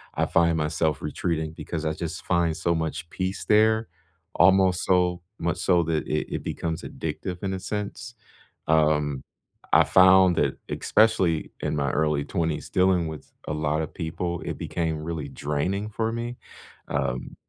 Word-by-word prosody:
I - - +1
find 85 -1 +3
myself 75 -1 0
retreating 80 +1 -2
because 80 0 -5
I 80 - 0
just 85 +1 -5
find 85 -3 +1
so 85 -2 +1
much 80 0 -3
peace 95 +2 -3
there, 110 +1 +4 0.5
almost 95 -1 +4
so 90 -1 +2 0.2
much 85 +2 -1
so 90 -2 +3
that 80 -1 -1
it 75 - -2
it - - -4
becomes 80 +1 -3
addictive 90 +1 -5
in 95 0 -1
a 95 - -3
sense. 105 +4 -5 0.5
Um, 75 -3 +2 0.5
I - - +8
found 95 -1 +6
that, - - +1
especially 95 -8 +2
in - - -1
my 70 -2 0
early 75 -1 +1
20s 80 -3 -2
dealing 90 -2 +2
with 80 -1 -9 0.2
a - - -2
lotta 75 +1 -1
people, 85 +1 -4
it - - -4
became 80 -2 -2
really 80 -3 -4
draining 90 +10 -2
for 110 +1 -1
me. 120 +1 -4 0.5
Um, 60 +1 -2
85 Hz, 155 wpm, -25 LUFS, 80-95 Hz, 0.5 s, I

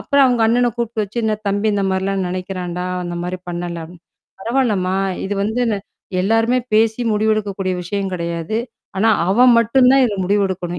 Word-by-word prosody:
அப்புறம் 280 -1 +3
அவுங்க 245 -3 +2
அண்ணன 240 +1 +3
கூப்பிட்டு 230 -2 -2
வச்சு, 210 +4 -7
"என்னா? 215 -1 +1
தம்பி 205 +2 0
இந்த 200 - 0
மாரிலாம் 190 0 -1
நெனைக்கிறான்டா! 180 -1 -4 0.2
அந்த 175 0 -4
மாரி 180 +1 -3
பண்ணல" 175 -1 -4
அப் 175 - -14 0.5
"பரவால்லம்மா! 210 -6 0 0.3
இது 205 - -2
வந்து 220 +4 -1
ந - - 0 0.5
எல்லாருமே 225 +4 +2 0.2
பேசி 220 +1 +3
முடிவெடுக்கக்கூடிய 210 -3 0
விஷயம் 195 +2 -3
கெடையாது. 170 +3 -3 0.4
ஆனா 215 +4 +3 0.2
அவன் 245 +5 +6
மட்டும் 250 +3 +4
தான் 270 -1 +5
இதுல 210 -5 -1
முடிவெடுக்கணும். 185 -3 -1
205 Hz, 160 wpm, -19 LUFS, 185-225 Hz, 0.5 s, அவன்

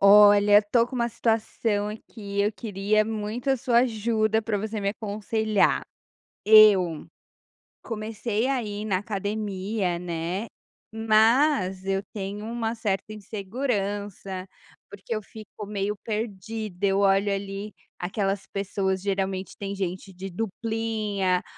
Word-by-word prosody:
Olha, 205 0 +8
estou 230 +3 +2
com 255 - -9
uma 235 -1 +1
situação 220 -2 0
aqui, 210 -2 -5
eu 210 +2 +1
queria 210 -1 +1
muito 220 +3 -4
a 270 - +4
sua 240 -1 +2
ajuda 220 -2 +1
para 215 -2 -1
você 220 +2 -3
me 200 0 +1
aconselhar. 215 0 0 0.6
Eu 200 -7 +6 0.8
comecei 220 +1 -2
a 265 -3 0
ir 210 0 -5
na 190 -3 +1
academia, 200 -2 -2
né, 175 +4 -3 0.5
mas 220 -2 +3
eu 195 0 0
tenho 205 +1 -5
uma 230 0 -2
certa 215 -2 -2
insegurança, 205 -3 -3 0.4
porque 200 +2 -6
eu 215 - -2
fico 215 0 -10
meio 205 0 -2
perdida, 215 -2 -3
eu 195 0 +2
olho 200 0 +3
ali, 195 +1 -5 0.3
aquelas 195 +1 -2
pessoas 195 -1 -1
geralmente 195 -1 -2
tem 200 0 -4
gente 190 0 -4
de 190 +2 -7
duplinha, 215 -2 -1
205 Hz, 120 wpm, -26 LUFS, 195-220 Hz, 0.8 s, Olha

